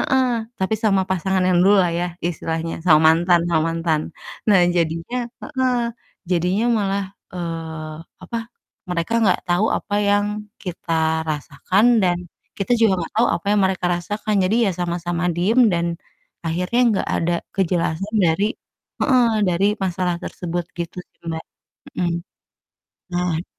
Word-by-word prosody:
heeh, 265 -1 +2 0.4
tapi 190 +3 +1
sama 195 -3 +4
pasangan 190 +1 +1
yang 180 -1 +3
dululah 195 -2 +5
ya 175 - 0 0.2
istilahnya, 165 0 -3
sama 155 -4 +6
mantan 175 +1 +3
sama 160 -2 +2
mantan. 165 -2 0 0.5
Nah, 200 -3 +6 0.2
jadinya 165 +7 -1 0.2
heeh, 260 -3 0 0.6
jadinya 180 +5 +1
malah, 200 0 0 0.3
eee, 165 -3 -5 0.3
apa, 230 - -5 0.5
mereka 170 +3 -2 0.2
gak 185 - +2
tahu 175 +4 +3
apa 205 - -5
yang 205 0 +3 0.4
kita 180 -2 -5 0.4
rasakan 155 +7 0 0.2
dan 175 -1 +2 0.4
kita 200 +4 0
juga 225 -3 +5
gak - - -10
tahu 235 +2 +4
apa - - -12
yang 210 - +3
mereka 190 -1 0
rasakan, 210 +5 -3
jadi 200 +5 +2
ya - - +2
sama-sama 175 0 -2
diem 210 +8 +3
dan 170 0 +1 0.6
akhirnya 180 +8 0 0.2
gak - - -4
ada 170 +1 0 0.2
kejelasan 185 +2 0
dari 165 +4 +2 0.6
heeh, 255 -3 +4 0.2
dari 180 +2 +2 0.2
masalah 180 -1 -1
tersebut, 175 0 -4
gitu 170 +1 -4
sih, - - -45
Mbak. 160 0 -4 0.6
Mhm. 175 -1 +1 1.0
Nah 175 -2 0
180 Hz, 135 wpm, -21 LUFS, 170-195 Hz, 1.0 s, sama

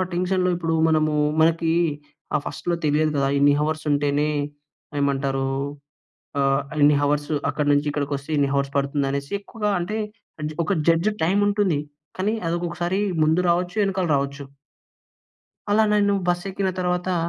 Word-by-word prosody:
ఆ - - +3
టెన్షన్‌లో 180 +1 +1
ఇప్పుడు 165 -2 -1
మనము 155 -1 +2 0.3
మనకి 165 0 +3 0.6
ఆహ్, 145 - +1
ఫస్ట్‌లో 175 -1 -2
తెలియదు 150 +1 +2
కదా! 135 -1 +2
ఇన్ని 145 0 +5
హౌర్స్ 155 +1 -1
ఉంటేనే 145 +1 +1 0.7
ఏమంటారు 135 -1 0 0.9
ఆహ్, 135 0 +2 0.2
ఎన్ని 145 0 +6
హౌర్స్ 145 +1 0 0.2
అక్కడి 145 -1 0
నుంచి 145 +1 +1
ఇక్కడికొస్తే 140 0 -3
ఇన్ని 140 -1 +2
హౌర్స్ 140 0 0
పడుతుంది 140 0 0
అనేసి 140 +3 -4
ఎక్కువగా, 210 0 -3
అంటే 210 +6 -3 0.5
జ్ - - -7
ఒక 200 - +1 0.2
జడ్జ్ 165 +5 +3
టైమ్ 195 +5 +2
ఉంటుంది. 200 -7 +1 0.4
కానీ 205 +4 0
అది 165 - 0
ఒకొకసారి 175 +2 -2 0.2
ముందు 160 +3 +3
రావచ్చు, 175 +2 0
వెనకాల 190 -2 0
రావచ్చు. 140 +1 -2 1.3
అలా 220 +1 +5
నన్ను 205 -1 +3
బస్సెక్కిన 190 +2 -1
తర్వాతా, 180 0 0
160 Hz, 140 wpm, -23 LUFS, 145-180 Hz, 1.3 s, ఎన్ని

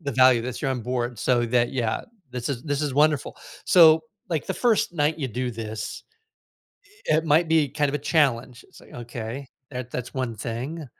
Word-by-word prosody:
the 140 -4 -4
value, 130 -2 +5
that 125 0 -5
you're 135 - -1
on 130 -2 -2
board 120 -1 -2
so 120 +1 +2
that 120 0 +1
yeah, 115 -4 -1 0.3
this 125 -1 -4
is 130 -4 -3
this 145 0 -1
is 145 -3 -1
wonderful, 150 -1 +2 0.3
so, 160 -3 +7 0.3
like, 160 -4 -2
the - - -2
1st 225 -7 +2
night 155 0 +1
you 135 -4 -2
do 125 +2 -3
this, 110 -1 -6 1.1
eh, 155 - +5
it 160 - -1
might 160 +2 +4
be 160 -2 +3
kind 145 -1 0
of 140 - -2
a - - -2
challenge, 130 -5 +1
it's - - -17
like, - - -17
"Okay, 120 +2 -6 0.2
that 125 -2 -6
that's 125 -1 -5
one 130 -4 -3
thing," 125 +9 -5
130 Hz, 200 wpm, -24 LUFS, 120-150 Hz, 1.1 s, so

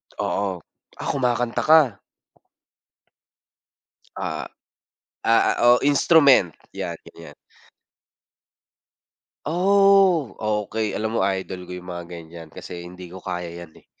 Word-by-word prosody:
Oo. 95 -3 -2 0.4
Ah, - - -6
kumakanta 125 -3 -1
ka. 150 -10 +4 2.2
Ah - - -4 0.8
ah 115 - +3
oh 120 0 +6
instrument 140 - +5 0.2
'yan - - -4
gan'yan. 80 -3 -13 2.1
Oh 190 - +3 0.3
okey, 110 -1 -3
alam 110 +1 -3
mo - - 0
idol 95 -1 -3
ko - - -7
yung 90 0 -9
mga 85 0 -7
ganyan 85 -1 -10
kasi 85 +2 -9
hindi 90 +1 -10
ko 95 - -10
kaya 85 -1 -6
yan 80 - -24
eh. - - -21
100 Hz, 105 wpm, -22 LUFS, 90-140 Hz, 2.2 s, oh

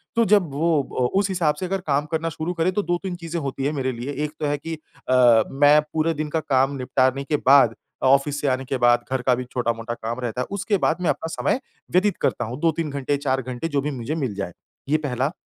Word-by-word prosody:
तो 230 - +4
जब 200 -6 +3
वो 155 +1 +2 0.4
उस 200 0 +1
हिसाब 170 -5 +1
से 185 - -2
अगर 190 +1 -2
काम 145 0 +1
करना 165 0 -1
शुरू 160 +2 -4
करें 170 +2 +1
तो 205 - +1
2-3 175 +1 -2
चीज़ें 170 -1 -5
होती 135 -1 -3
हैं 145 - +1
मेरे 130 -3 -1
लिए, 125 +3 -5
एक 150 - -5
तो - - -1
है 145 0 0
कि 165 +3 -5 0.3
अ, 120 -3 +6
मैं 145 +2 +5
पूरे 160 +1 +1
दिन 155 0 -3
का 160 - 0
काम 135 -2 +1
निपटाने 130 +1 +1
के 150 +2 0
बाद 135 -4 +6 0.3
ऑफ़िस 140 +2 +3
से 145 - 0
आने 130 0 0
के 135 - -2
बाद 120 -1 +4
घर 130 -1 0
का 125 0 +3
भी 125 - -4
छोटा-मोटा 120 -1 -2
काम 115 +1 -5
रहता 125 0 -3
है - - -3
उसके 200 +1 0
बाद 165 -2 +1
मैं 175 - +1
अपना - - -1
समय - - 0 0.3
व्यतीत 185 +1 +2
करता 120 - 0
हूँ। 120 +4 -6
2-3 165 -1 +1
घंटे, 140 0 -1
4 135 -2 0
घंटे 130 +4 -4
जो 145 -3 0
भी 150 +2 -2
मुझे 130 +3 -4
मिल 135 -9 -2
जाए। 100 -3 -4 0.4
ये 155 - +4
पहला, 135 -2 -1
145 Hz, 240 wpm, -23 LUFS, 130-165 Hz, 0.4 s, अ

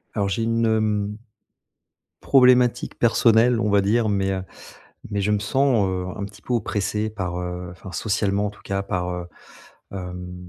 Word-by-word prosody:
Alors 100 -2 0
j'ai 115 +3 -1
une, 115 0 +1
hem, 105 -2 0 1.0
problématique 125 -2 +4
personnelle 115 0 +4
on 105 - 0
va 100 0 +4
dire 110 +3 +1
mais, 100 -2 0
heu, 95 -1 -2 0.7
mais 100 -1 -1
je 105 +2 +1
me 105 - +2
sens, 125 -2 +2
heu, 90 -1 -2
un 100 - -4
petit 100 +1 -13
peu 125 - -3
oppressé 105 -1 -1
par, 90 -4 -4
heu, 90 0 -5
enfin, 90 +1 -11
socialement 100 +1 0
en - - -3
tout 105 - -18
cas 100 0 -2
par, 90 -2 -2
heu, 90 -1 -5 0.7
hem, 90 -1 -7
100 Hz, 170 wpm, -23 LUFS, 95-110 Hz, 1.0 s, problématique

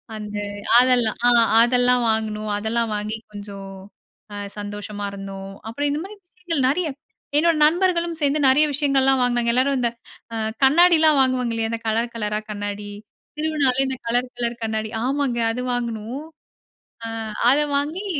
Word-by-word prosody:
அந்த 210 -1 -6 0.4
அதெல்லாம் 245 -3 +3
ஆ - - +7 0.3
அதெல்லாம் 245 0 +3
வாங்குனோம். 215 -1 -2
அதெல்லாம் 225 +1 -1
வாங்கி 210 +1 -3
கொஞ்சம் 200 -1 -9 0.6
அ - - -6 0.2
சந்தோஷமா 205 0 -6
இருந்தோம். 195 -1 -8 0.2
அப்புறம் 285 +5 -2
இந்தமாரி 370 +8 -5 0.2
விஷயங்கள் 335 -7 -2
நிறைய 335 +5 0 0.5
என்னோட 330 +1 +3
நண்பர்களும் 340 0 +1
சேர்ந்து 290 +1 +2
நிறைய 295 +4 +5
விஷயங்கள்லாம் 270 -2 +2
வாங்கினாங்க. 240 -1 +1
எல்லாரும் 265 +2 +2
இந்த 240 -1 +1 0.4
அ - - -3 0.3
கண்ணாடிலாம் 315 0 +5
வாங்குவாங்க 255 -3 +1
இல்லயா! 225 0 -1
அந்த 230 0 -4
கலர், 230 +2 0
கலரா 210 -1 -1
கண்ணாடி. 205 0 -5 0.5
திருவிழானாலே 290 -4 +2
இந்த 265 0 -3
கலர் 245 +2 0
கலர் 235 0 -3
கண்ணாடி, 220 0 -2 0.2
ஆமாங்க. 270 -3 -1
அது 250 +2 -4
வாங்கினோம். 235 +3 -4 0.8
ஆ - - -3 0.4
அத 280 - +3 0.2
வாங்கி 315 +8 -3
245 Hz, 140 wpm, -22 LUFS, 220-285 Hz, 0.8 s, ஆ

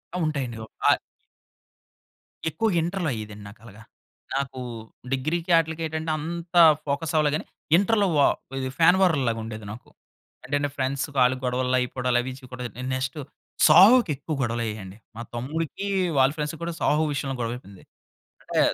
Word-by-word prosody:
ఆ! - - -1
ఉంటాయండి. 135 -7 -2
ఒ - - -7 0.2
ఆ - - +8 1.6
ఎక్కువగా 200 +5 0
ఇంటర్‌లో 175 -2 -2
అయ్యేదండి 105 -2 -7
నాకలాగా. 110 0 -15 0.5
నాకు 135 -1 -3 0.5
డిగ్రీకి 165 +6 -1
ఆటిలికి 160 0 -1
ఏటంటే 160 +1 -4
అంత 170 +3 -6 0.3
ఫోకస్ 150 +3 -2
అవ్వలే 150 -1 +4
గాని - - -4 0.3
ఇంటర్‌లో 205 0 +2
వా 140 - +6 0.3
ఇది 130 - -2
ఫ్యాన్ 180 +3 +6
వార్‌లాగా 135 -11 +2
ఉండేది 110 -2 -7
నాకు. 120 - -11 0.6
అంటే 145 +2 0
నా 145 - 0
ఫ్రెండ్స్‌కి 140 +2 -2
ఆళ్ళకి 130 +1 +1
గొడవలు 125 +1 +1
అయిపోవడాలు 125 0 0
అవి 130 +1 -5
చూడ 125 -1 -11 0.4
నెక్స్టు 130 +3 -3 0.5
'సాహో'కి 190 +5 +7
ఎక్కువ 155 +3 -5
గొడవలయ్యేయండి. 110 -5 -3 0.2
మా 115 - -6
తమ్ముడికి, 155 +9 -3 0.3
వాళ్ళ 135 +1 +5
ఫ్రెండ్స్‌కి 150 +1 -4
కూడా 170 0 -3
'సాహో' 155 +1 +2
విషయంలో 135 -1 -3
గొడవయిపోయింది. 115 -5 -6 0.6
అంటే - - 0
140 Hz, 140 wpm, -25 LUFS, 125-160 Hz, 1.6 s, ఆ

